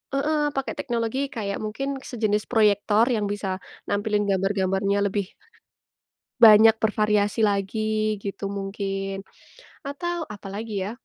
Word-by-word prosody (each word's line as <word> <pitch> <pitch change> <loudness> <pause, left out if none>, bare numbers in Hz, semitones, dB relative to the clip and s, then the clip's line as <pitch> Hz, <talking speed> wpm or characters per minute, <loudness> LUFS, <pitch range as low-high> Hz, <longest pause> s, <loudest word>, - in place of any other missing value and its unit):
heeh, 305 +3 +1 0.2
pakai 270 - -2
teknologi 235 0 -2 0.2
kayak 200 -3 -3
mungkin 270 +6 -3
sejenis 215 -3 0
proyektor 210 -1 +3
yang 215 -3 0
bisa 195 -2 -3 0.3
nampilin 205 0 0
gambar-gambarnya 195 +1 +1
lebih 200 -2 -1 1.1
banyak 220 -1 +9
bervariasi 210 0 +1
lagi 215 +1 0
gitu 200 0 -4
mungkin, 195 0 -4 0.7
atau 335 +1 -4
apalagi 210 +2 -7
ya, 210 - -4
210 Hz, 110 wpm, -24 LUFS, 200-225 Hz, 1.1 s, banyak